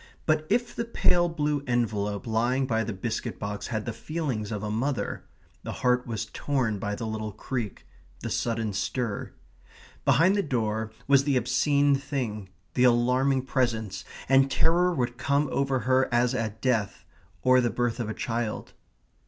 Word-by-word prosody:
But 155 -1 +1
if 240 0 +1
the 235 - -1
pale 175 -6 +2
blue 150 -3 -1
envelope 105 -4 0
lying 120 +4 +1
by 115 -3 +1
the 115 - -3
biscuit 95 -2 -3
box 105 0 -4
had 110 -3 -3
the 120 - -3
feelings 120 -4 -3
of 105 -1 -3
a 105 - -2
mother, 130 +5 -2 0.4
the - - -5
heart 125 0 +3
was 110 -2 -3
torn 115 -2 -1
by 105 +1 -2
the 115 - -5
little 110 -1 -3
creak, 110 0 -5 0.4
the - - -4
sudden 115 -3 -1
stir. 105 +2 -2 0.7
Behind 160 +8 +4
the 205 - +2
door 110 - -1 0.2
was 140 0 +5
the 140 -3 +3
obscene 140 +4 +3
thing, 125 -8 -3 0.2
the 125 - +2
alarming 125 +2 +3
presence, 110 -8 -1 0.2
and 135 +1 +5
terror 175 +6 +3
would 120 -6 -2
come 140 +1 +2
over 135 -2 +1
her 130 +3 +2
as 120 +1 +3
at 110 -3 -3
death, 115 -6 0 0.4
or 130 0 +6
the 120 - +1
birth 120 0 -1
of 115 -2 -2
a 110 - -4
child. 115 -2 -3
120 Hz, 165 wpm, -27 LUFS, 110-135 Hz, 0.7 s, or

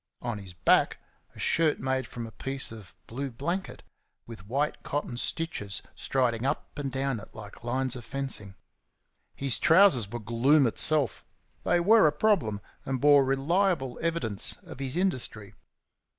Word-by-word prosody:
On 120 -3 -3
his 95 -2 -10
back 85 - +3 0.4
a - - -12
shirt 160 -2 +2
made 130 -1 -1
from 120 0 -6
a 115 - -9
piece 135 +4 -4
of 110 -5 -11
blue 135 +4 -4
blanket, 170 +11 -4 0.4
with 110 -5 -11
white 140 +6 -1
cotton 145 -4 -3
stitches 110 - -4
striding 125 -3 0
up 140 +3 -2
and 140 -2 -3
down 135 -2 -1
it 110 - -13
like 110 +1 -10
lines 130 +1 -1
of 120 - -7
fencing. 130 -8 -5 0.8
His 135 -2 0
trousers 160 - +5
were 120 - -3
gloom 120 +6 +3
itself; 140 +1 +2 0.4
they 175 - +3
were 205 +1 +6
a - - +3
problem, 150 - +1 0.2
and 130 -1 -2
bore 145 +1 +6
reliable 135 +1 +1
evidence 160 -11 -2
of - - -11
his 135 +3 -2
industry. 130 - -1
135 Hz, 150 wpm, -28 LUFS, 115-150 Hz, 0.8 s, were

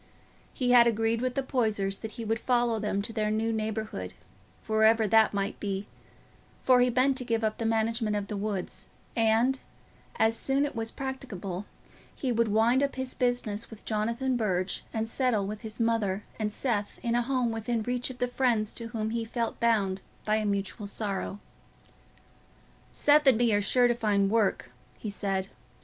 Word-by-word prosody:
He 250 -2 0
had 240 -1 +7
agreed 225 0 +1
with 255 0 -1
the 275 - 0
Poysers 215 -7 0
that 220 -1 -7
he 230 - -6
would 225 +1 0
follow 240 -3 +1
them 205 -1 -1
to 225 - -3
their 215 -2 0
new 220 +1 0
neighbourhood, 215 - -3 0.5
wherever 220 0 +4
that 220 +2 +5
might 200 -1 -2
be, 200 -1 -3 0.7
for 255 -1 +4
he 250 - +4
meant 260 +2 +2
to 255 - 0
give 230 -2 -1
up 215 0 -1
the 230 - 0
management 225 -1 0
of 205 -1 -1
the 210 - -5
woods, 200 -2 -4 0.3
and, 230 +4 +3 0.6
as 225 0 +3
soon 270 +4 +2
as 290 - -3
it - - -18
was 225 0 -2
practicable, 210 -9 -5 0.5
he 260 - -2
would 230 -1 +2
wind 225 +5 +3
up 280 0 0
his 260 -1 -3
business 240 -3 -1
with 220 -2 -13
Jonathan 235 +4 0
Burge 190 -5 -1
and 225 0 -2
settle 230 -4 +1
with 210 +1 -5
his 220 0 -7
mother 215 -4 +1 0.2
and 210 -1 -1
Seth 210 -3 -2
in 235 -1 0
a 240 - +3
home 250 -1 0
within 225 0 -2
reach 245 +2 -2
of 255 - -8
the 250 0 0
friends 240 -4 +1
to 230 - -5
whom 220 -1 -3
he 230 0 -1
felt 230 +1 -3
bound 205 -5 +1 0.2
by 215 0 +2
a 215 -1 -1
mutual 200 +1 -2
sorrow. 200 -1 -3 1.5
"Seth 295 0 +4
and 260 -4 +7
me 235 -2 +3
are 205 - +3
sure 245 +5 +3
to 240 - +3
find 205 -4 +1
work," 205 - +1 0.3
he 215 - -5
said. 195 -1 -2
225 Hz, 185 wpm, -28 LUFS, 210-245 Hz, 1.5 s, had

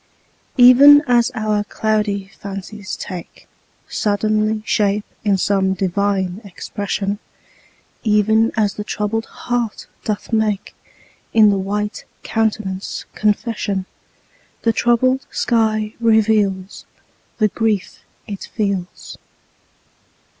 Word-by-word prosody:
Even 275 +4 +9
as 240 -2 +3
our 215 -2 0
cloudy 210 -2 -1
fancies 200 +1 -6
take 180 -2 -8 0.4
Suddenly 215 +1 0
shape 210 -2 +1 0.2
in 200 -2 +2
some 190 0 +1
divine 195 0 -1
expression, 200 +1 -4 0.8
Even 220 +1 +3
as 205 -2 +2
the 210 - -5
troubled 210 +2 -2
heart 240 -3 -3 0.2
doth 215 +2 -4
make 215 -3 0 0.6
In 215 -2 +7
the 200 - 0
white 210 +2 -3 0.2
countenance 210 -3 -2
confession, 210 -2 -1 0.8
The 230 - +3
troubled 255 +3 +2
sky 215 -2 0
reveals 215 -4 +1 0.5
The 215 -2 +3
grief 215 -3 -1 0.3
it 200 -2 -7
feels. 200 -4 -3
210 Hz, 95 wpm, -19 LUFS, 200-220 Hz, 0.8 s, Even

